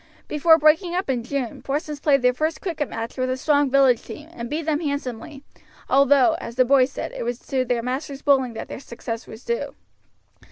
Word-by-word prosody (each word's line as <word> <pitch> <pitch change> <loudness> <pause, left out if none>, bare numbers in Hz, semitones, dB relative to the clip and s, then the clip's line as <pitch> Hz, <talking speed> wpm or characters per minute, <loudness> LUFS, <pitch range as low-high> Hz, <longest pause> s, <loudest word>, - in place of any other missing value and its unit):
Before 320 +2 +5
breaking 325 +3 +3
up 365 -6 0
in 245 -3 -2
June, 255 -2 -4
Porson's 295 +1 -3
played 275 -3 +2
their 250 0 +4
first 310 +5 -2
cricket 315 -6 -3
match 230 +3 -6
with 255 0 0
a 255 - -1
strong 285 0 +2
village 260 -3 +4
team, 305 +2 -10
and 235 -7 -7
beat 310 +2 -2
them 305 -2 0
handsomely, 280 -2 -5 0.4
although, 275 -1 +5
as 235 - -7
the 255 0 +4
boys 265 0 +4
said, - - -5
it - - -7
was 240 0 -2
to 260 -1 +1
their 240 -2 -1
master's 270 +2 -4
bowling 265 -4 +3
that 225 - -6
their - - -7
success 235 -3 -7
was 220 +2 -12
due. 470 0 -3
275 Hz, 205 wpm, -23 LUFS, 250-300 Hz, 0.4 s, Before